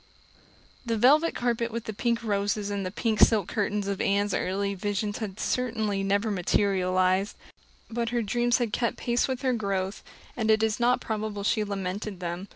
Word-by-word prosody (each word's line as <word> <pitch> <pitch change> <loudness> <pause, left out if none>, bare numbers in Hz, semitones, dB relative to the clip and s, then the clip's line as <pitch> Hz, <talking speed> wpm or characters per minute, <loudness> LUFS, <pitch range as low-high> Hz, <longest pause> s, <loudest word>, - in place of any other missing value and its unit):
The 230 -2 -1
velvet 295 +9 +4
carpet 235 -1 0
with 230 0 -4
the 220 - -5
pink 235 +2 -1
roses 205 -1 -1
and 200 -1 -2
the 185 - -2
pink 215 +2 -1
silk 210 -5 +5
curtains 210 -1 -1
of 200 -1 -2
Anne's 200 0 +1
early 200 +2 -1
visions 205 +1 -2
had 210 -3 -5
certainly 220 -5 -1
never 200 +3 +1
materialized; 185 0 +1 0.5
but 235 0 -2
her 240 -1 0
dreams 240 +3 +2
had 235 -4 -2
kept 235 -2 0
pace 240 0 +1
with 260 0 -3
her 260 -1 +2
growth, 195 -3 -2 0.3
and 220 -2 -1
it 220 0 +4
is 220 -1 +1
not 245 +1 +3
probable 215 -2 -3
she 215 +1 +2
lamented 200 0 -4
them. 175 +2 -4
210 Hz, 175 wpm, -27 LUFS, 200-235 Hz, 0.5 s, silk